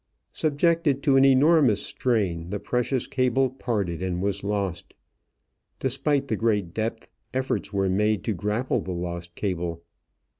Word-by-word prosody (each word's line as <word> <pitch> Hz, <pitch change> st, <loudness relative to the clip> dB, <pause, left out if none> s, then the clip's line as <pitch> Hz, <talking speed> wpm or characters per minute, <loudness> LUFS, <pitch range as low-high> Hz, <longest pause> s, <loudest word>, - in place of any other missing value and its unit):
Subjected 155 Hz, -2 st, +1 dB
to 140 Hz, -3 st, +4 dB
an 135 Hz, -, +6 dB
enormous 135 Hz, -4 st, +5 dB
strain, 95 Hz, -9 st, -1 dB
the 100 Hz, +1 st, -3 dB
precious 125 Hz, +2 st, -1 dB
cable 130 Hz, 0 st, +1 dB
parted 105 Hz, -10 st, -2 dB
and 90 Hz, -1 st, -2 dB
was 100 Hz, +1 st, -1 dB
lost. 100 Hz, -4 st, -3 dB, 0.8 s
Despite 135 Hz, +2 st, 0 dB
the 110 Hz, -, 0 dB
great 105 Hz, -6 st, 0 dB
depth, 115 Hz, +1 st, -3 dB, 0.3 s
efforts 130 Hz, 0 st, -1 dB
were 100 Hz, -1 st, +1 dB
made 105 Hz, +1 st, +1 dB
to 110 Hz, -, -1 dB
grapple 105 Hz, +6 st, -1 dB
the 95 Hz, -3 st, -4 dB
lost 85 Hz, 0 st, -5 dB
cable. 85 Hz, -4 st, -3 dB
110 Hz, 140 wpm, -25 LUFS, 95-130 Hz, 0.8 s, an